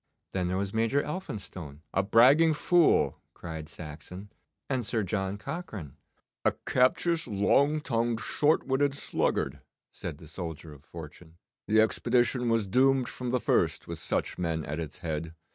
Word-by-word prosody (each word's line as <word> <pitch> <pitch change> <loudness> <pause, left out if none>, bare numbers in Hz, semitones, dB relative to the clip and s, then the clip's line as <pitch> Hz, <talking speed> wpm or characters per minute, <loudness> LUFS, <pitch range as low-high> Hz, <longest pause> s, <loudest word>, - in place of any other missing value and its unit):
'Then 90 -2 -1
there 90 +1 -1
was 100 +1 -2
Major 115 +6 +2
Elphinstone.' 95 - -6
'A 95 - +3
bragging 135 +11 +6
fool!' 175 +2 +3
cried 80 -2 -7
Saxon.' 85 +6 -9 0.4
'And 130 -3 0
Sir 110 0 0
John 95 +1 -2
Cochrane.' 105 - -6 0.5
'A - - +3
captious, 160 +6 +2
long 140 +9 +3
tongued, 115 -4 0
short 150 +7 +2
witted 140 +1 +1
sluggard,' - - -1 0.3
said - - -6
the 80 - -13
soldier 80 -2 -7
of 70 -1 -16
fortune. 80 +1 -11 0.3
'The 110 +1 +5
expedition 120 +2 +2
was 115 -2 +2
doomed 130 +4 +3
from 125 -1 -4
the 125 +1 +1
first - - +1
with - - -6
such - - -2
men 80 -3 -1
at 75 +2 -4
its 80 +1 -5
head. 80 0 -3
105 Hz, 150 wpm, -29 LUFS, 85-130 Hz, 0.5 s, bragging